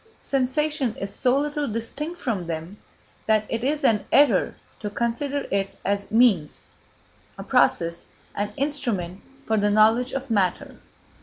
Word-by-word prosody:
Sensation 275 -1 0
is 195 0 -5
so 255 +1 +2
little 295 0 -1
distinct 285 +10 -4
from 205 -9 -2
them 165 +4 -5 0.5
that 215 -1 +3
it 230 +1 -2
is 290 +3 0
an 225 -6 +3
error 275 -10 +4 0.2
to 210 - -4
consider 240 +6 -2
it 195 0 -1
as 200 0 -1
a - - -13
means, 210 -11 +2 0.7
a - - -6
process, 170 0 +1 0.3
an 205 +1 -2
instrument 235 - -2 0.2
for 220 - +1
the 205 0 +2
knowledge 220 +4 +4
of 270 -2 -4
matter. 190 -5 0
230 Hz, 145 wpm, -24 LUFS, 200-275 Hz, 0.7 s, error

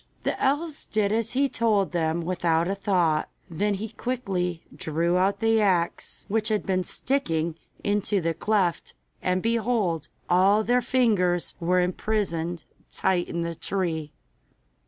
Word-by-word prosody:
The - - -2
elves 290 +3 0
did 210 -2 0
as 225 +1 0
he 275 +2 +3
told 220 -6 +1
them 165 -1 0
without 170 -2 +1
a 195 - 0
thought; 180 -6 +1 0.2
then 200 +5 0
he 215 +3 -5
quickly 195 -8 -3
drew 165 +3 0
out 190 +4 +1
the 225 0 +3
axe, 180 -4 0
which 215 +1 +1
had 215 -2 0
been 185 -1 +1
sticking 170 - -1 0.3
into 205 0 +1
the 165 -1 0
cleft, 185 0 0 0.3
and 185 0 0
behold! 220 - 0 0.2
all 195 +4 +4
their 245 +3 +2
fingers 210 -9 +2
were 180 +2 +2
imprisoned 175 -3 -1 0.2
tight 180 -2 +1
in 170 0 -2
the 170 0 -3
tree. 165 -4 -2
190 Hz, 140 wpm, -26 LUFS, 170-220 Hz, 0.3 s, all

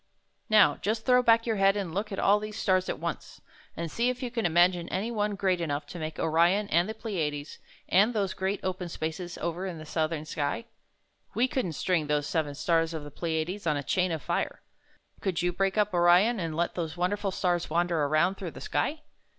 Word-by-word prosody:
"Now, 215 -2 +5
just 220 +2 -2
throw 250 0 +5
back 230 -1 +4
your 225 -3 0
head 195 +1 +4
and 185 -5 -3
look 210 +4 -2
at 195 - -4
all 205 +1 +4
these 215 0 -6
stars 185 -3 +1
at - - -2
once, - - -5 0.4
and 165 -1 -4
see 235 +7 +1
if 250 +1 -4
you 245 - -3
can 230 -5 0
imagine 175 +1 +3
any 205 +5 -2
one 210 -2 -1
great 185 -3 0
enough 145 -3 -2
to 175 - -7
make 155 -1 -5
Orion 170 +6 +2
and 170 +5 +2
the 220 - -4
Pleiades 155 -10 -4 0.3
and 200 +6 +4
those 200 -5 -1
great, 190 +1 -2
open 185 -1 -3
spaces 165 +2 -5
over 170 +3 -3
in 175 -3 -5
the 155 - -9
southern 155 0 -2
sky? 150 +7 -2 0.7
We 245 +3 +3
couldn't 250 -11 -2
string 160 0 0
those 150 -1 +1
seven 150 -2 -1
stars 165 +1 +1
of 155 - -5
the 145 - -9
Pleiades 165 +5 -3
on 150 -2 +2
a 145 - -3
chain 180 +4 +1
of 160 -3 -3
fire. - - -2 0.6
Could 180 -3 -1
you 175 0 +1
break 195 +3 0
up 210 -2 +2
Orion 180 +6 +4
and 165 -3 -3
let 170 0 0
those 165 -1 -4
wonderful 195 +3 0
stars 180 -2 0
wander 170 -1 +1
around 155 +6 +2
through 185 - -4
the - - -10
sky?" 310 +1 -1
180 Hz, 215 wpm, -28 LUFS, 160-205 Hz, 0.7 s, Now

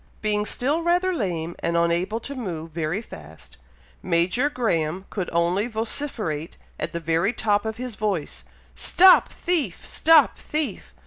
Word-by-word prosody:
Being 210 -1 0
still 290 +7 0
rather 355 +2 +2
lame, 175 - -3
and 170 0 -1
unable 170 +6 +1
to 280 - -5
move 170 - -5
very 165 +6 -2
fast, 75 - -13 0.4
Major 185 +10 +1
Graham 185 - -1
could 190 -4 -3
only 175 +5 +1
vociferate 220 - -4 0.2
at - - -3
the 170 - -3
very 165 +6 +1
top 205 -2 +1
of 220 0 -4
his 250 -2 -6
voice, 190 - -3 0.3
"Stop 365 - +6
thief! 310 - -2
stop 320 -3 +4
thief!" 305 -1 -4
205 Hz, 140 wpm, -24 LUFS, 170-255 Hz, 0.4 s, Stop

